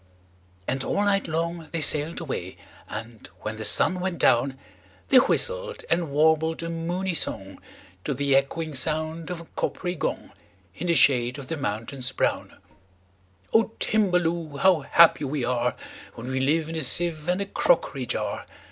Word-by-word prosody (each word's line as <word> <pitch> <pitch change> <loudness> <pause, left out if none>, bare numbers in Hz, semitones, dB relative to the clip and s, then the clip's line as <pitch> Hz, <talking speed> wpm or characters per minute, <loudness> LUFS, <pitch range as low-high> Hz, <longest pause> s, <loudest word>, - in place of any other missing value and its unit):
And 135 +1 -1
all 205 - 0
night 200 -1 +1
long 165 +1 -3
they 165 - -2
sail'd 150 +2 +1
away; 95 - -5 0.3
And, 115 +1 -8
when 110 +1 -4
the 110 - -5
sun 185 - +3
went 180 -1 -2
down, 130 +3 +3 0.5
They - - +7
whistled - - +1
and 170 -2 +1
warbled 160 +3 +2
a 165 - -3
moony 175 +3 -2
songTo 95 - -4
the 140 -1 +2
echoing 155 +3 0
sound 155 +4 -1
of 175 -2 -5
a - - -12
coppery 180 -1 -2
gong, 160 - -3 0.4
In 180 - -4
the 170 - +3
shade 125 -3 +3
of 135 -2 -9
the 165 - -1
mountains 125 +2 -4
brown,"O 95 - -3
Timballoo! 175 -7 +1
how 185 +2 +4
happy 160 +2 +5
we 140 -1 -2
areWhen 125 0 0 0.5
we 130 0 -1
live 155 +4 +1
in 165 - -5
a 160 - -1
sieve 165 -1 -1
and 180 +2 +1
a 200 - -1
crockery - - +1
jar! - - -3
155 Hz, 155 wpm, -25 LUFS, 125-170 Hz, 0.5 s, They